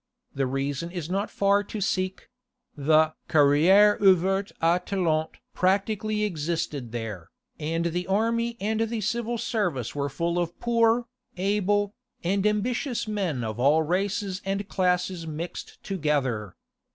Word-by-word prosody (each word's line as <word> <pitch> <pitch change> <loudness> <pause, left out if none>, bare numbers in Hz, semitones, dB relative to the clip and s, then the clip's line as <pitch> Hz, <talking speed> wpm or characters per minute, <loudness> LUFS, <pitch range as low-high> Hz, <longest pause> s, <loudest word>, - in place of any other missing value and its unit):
The 135 -1 0
reason 135 +4 -2
is 175 -2 -5
not 200 +3 -1
far 200 +1 +2
to 215 - -6
seek: 185 -1 -2 0.5
the 155 +2 +3 0.2
"carrière 165 +9 +5
ouverte 195 +1 +3
aux 170 +2 +3
talents" 160 -6 -1 0.2
practically 210 +3 +1
existed 155 - -2
there, 110 -7 -5 0.3
and 165 +2 -1
the 175 +1 -2
army 230 +4 0
and 215 +2 -1
the 225 0 -1
civil 235 +3 -1
service 180 - -1
were 140 0 -2
full 170 +5 -1
of 175 -1 -3
poor, 235 0 +2 0.3
able, 205 +1 +1 0.3
and 195 +4 +1
ambitious 235 +4 -1
men 185 - -1
of 110 0 -4
all 145 +5 +4
races 190 +3 -1
and 195 +1 -2
classes 180 -2 0
mixed 160 +3 -7
together. 140 - -1
185 Hz, 130 wpm, -26 LUFS, 155-205 Hz, 0.5 s, carrière